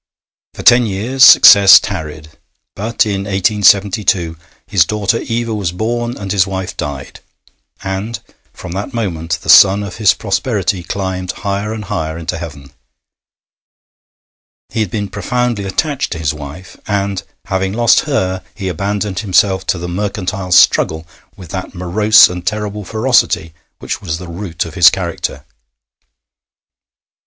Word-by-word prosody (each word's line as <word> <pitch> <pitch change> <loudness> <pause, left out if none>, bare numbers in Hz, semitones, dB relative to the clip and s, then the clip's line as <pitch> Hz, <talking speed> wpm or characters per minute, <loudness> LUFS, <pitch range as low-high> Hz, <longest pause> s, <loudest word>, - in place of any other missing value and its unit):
For - - -8
ten 120 -1 +5
years 115 +7 0
success 100 -7 +9
tarried, 80 -4 -7 0.5
but 110 +3 -1
in 100 -2 -3
1872 100 -2 +2 0.3
his - - +3
daughter 105 +1 -1
Eva 115 0 -3
was 100 -5 -2
born 120 +6 -3
and 100 -1 -6
his 95 -2 +2
wife 95 -1 -5
died, 70 -2 -6 0.6
and 100 +4 -4 0.3
from - - -10
that 100 +8 -5
moment 85 -7 -3
the - - -12
sun 100 +1 +6
of 100 -3 -8
his 110 -2 +3
prosperity 95 - -2
climbed 95 0 -4
higher 100 +2 -2
and 110 -1 -6
higher 80 -3 -4
into 85 +1 -5
heaven. 75 -5 -9 2.0
He 110 - -4
had 105 -4 -1
been 105 +1 -3
profoundly 115 +1 -2
attached 140 +5 -2
to - - -6
his 80 -2 -2
wife, 75 +5 -10
and, 100 -2 -2 0.2
having 95 -1 -2
lost 120 +1 +3
her 95 -9 -1
he 95 -2 -4
abandoned 100 +2 -3
himself 95 -2 +1
to - - 0
the 85 +1 -6
mercantile 95 0 -4
struggle 80 -2 +3 0.3
with 90 -4 -12
that 95 0 -6
morose 105 +5 +5
and 90 0 -7
terrible 105 -1 -3
ferocity 110 -7 0 0.2
which - - -5
was 80 -5 -4
the 90 0 -9
root 85 -1 -5
of - - -9
his - - +7
character. - - -5
95 Hz, 140 wpm, -15 LUFS, 90-105 Hz, 2.0 s, success